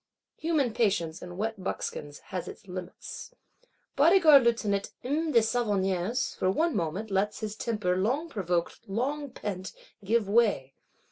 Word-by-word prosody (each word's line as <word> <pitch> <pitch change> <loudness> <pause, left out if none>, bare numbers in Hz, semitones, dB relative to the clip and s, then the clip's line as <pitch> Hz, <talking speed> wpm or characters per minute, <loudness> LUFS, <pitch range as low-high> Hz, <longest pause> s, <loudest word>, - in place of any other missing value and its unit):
Human 305 -8 +1
patience, 190 -8 0
in 175 0 -8
wet 215 -1 -3
buckskins, 145 -5 -4 0.2
has 180 -2 -3
its - - -10
limits. 185 - -8 0.6
Bodyguard 310 -2 +7
Lieutenant, 210 -4 +1
M. 305 +5 0
de 235 - +6
Savonnières, 210 -1 0
for 185 - +1
one 320 - +1
moment, 190 +4 -2
lets 200 +3 0
his 215 -1 -3
temper, 210 -6 -1
long 250 - 0
provoked, 180 - -2
long 280 +8 -2
pent, 190 -6 -5 0.3
give 220 +1 +1
way. 200 - +2
210 Hz, 135 wpm, -28 LUFS, 185-250 Hz, 0.6 s, Bodyguard